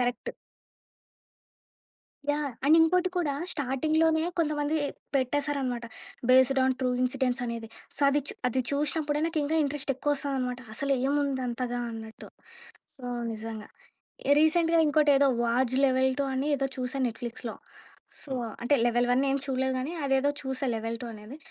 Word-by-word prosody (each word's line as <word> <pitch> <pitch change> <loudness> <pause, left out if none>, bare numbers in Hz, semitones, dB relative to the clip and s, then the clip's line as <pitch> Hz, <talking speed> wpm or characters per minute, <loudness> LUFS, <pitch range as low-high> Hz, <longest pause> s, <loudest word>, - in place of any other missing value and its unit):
Correct. 245 0 -1 2.0
Yeah! 290 -1 -1
And 305 +3 +6
ఇంకోటి 360 +3 +3
కూడా 320 -5 +1 0.2
స్టార్టింగ్‌లోనే 315 +4 +1 0.2
కొంతమంది 300 -1 0 0.4
పెట్టేశారనమాట. 270 -2 0 0.4
బేస్డ్ 260 +1 +5
ఆన్ 260 0 +2
ట్రూ 255 - +1
ఇన్సిడెంట్స్ 255 0 0
అనేది. 230 -1 -5 0.3
సో, - - -5
అది 290 +1 +2
చు - - -2
అది 255 +2 0
చూషినప్పుడే 295 +1 0
నాకు 330 -1 -1
ఇంకా 315 +3 0
ఇంట్రెస్ట్ 285 0 -2
ఎక్కువ 290 +3 0
ఒస్తాదనమాట. 260 -3 -2
అసలు 280 +3 0
ఏముంది 280 -2 0
అంతగా 245 0 -2
అన్నట్టు. 220 0 -9 0.7
సో, 265 - -14 0.3
నిజంగా. 220 -1 -6 0.7
రీసెంట్‌గా 330 +1 +4
ఇంకోటేదో 290 -2 +4
'వాజ్ 240 +2 +1
లెవెల్ 260 0 +3
టూ' 280 - +1
అని 275 +3 -1
ఏదో 270 0 -1
చూసా 260 +2 -3
నెట్‌ఫ్లిక్స్‌లో 235 0 -6 0.7
సో, 275 - -10 0.3
అంటే 265 +5 +3
లెవెల్ 240 +1 +2
వన్ 260 +2 +3
ఏం 275 - +2
చూడలేదు 265 -1 0
గానీ, 265 +5 -3
అదేదో 270 0 +2
చూసా 265 0 -3
లెవెల్ 225 +1 -3
టూ 245 - -5
అనేది 215 +7 -10
270 Hz, 140 wpm, -28 LUFS, 250-290 Hz, 2.0 s, And